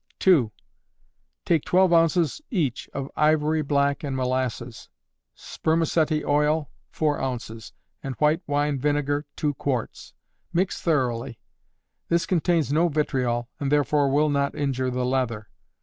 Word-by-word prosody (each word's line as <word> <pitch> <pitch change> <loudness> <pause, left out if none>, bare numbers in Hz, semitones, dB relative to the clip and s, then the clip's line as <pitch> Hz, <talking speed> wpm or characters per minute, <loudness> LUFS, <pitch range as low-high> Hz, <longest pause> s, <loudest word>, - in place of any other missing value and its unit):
2. 150 - +4 0.9
Take 165 -4 +2
twelve 185 -1 +3
ounces 165 - +2
each 155 - -2
of 140 0 -5
ivory 155 0 +2
black 140 0 0
and 140 -2 -3
molasses; 125 -2 -3 0.5
spermaceti 160 - 0
oil, 150 +1 +1 0.2
four 150 -2 -1
ounces; 115 -4 -5 0.3
and 135 -2 -5
white 155 +3 +2
wine 145 -1 0
vinegar, 145 +1 0
two 150 -1 -1
quarts. 125 - -4 0.4
Mix 180 +3 -1
thoroughly. 125 -6 -1 0.7
This 170 +1 +2
contains 170 -4 +1
no 165 +3 +3
vitriol, 130 -6 -1
and 140 -1 -2
therefore 145 0 +2
will 150 +3 +2
not 140 -1 0
injure 130 -3 -1
the 125 0 -2
leather. 125 -5 -1
145 Hz, 125 wpm, -25 LUFS, 130-155 Hz, 0.9 s, 2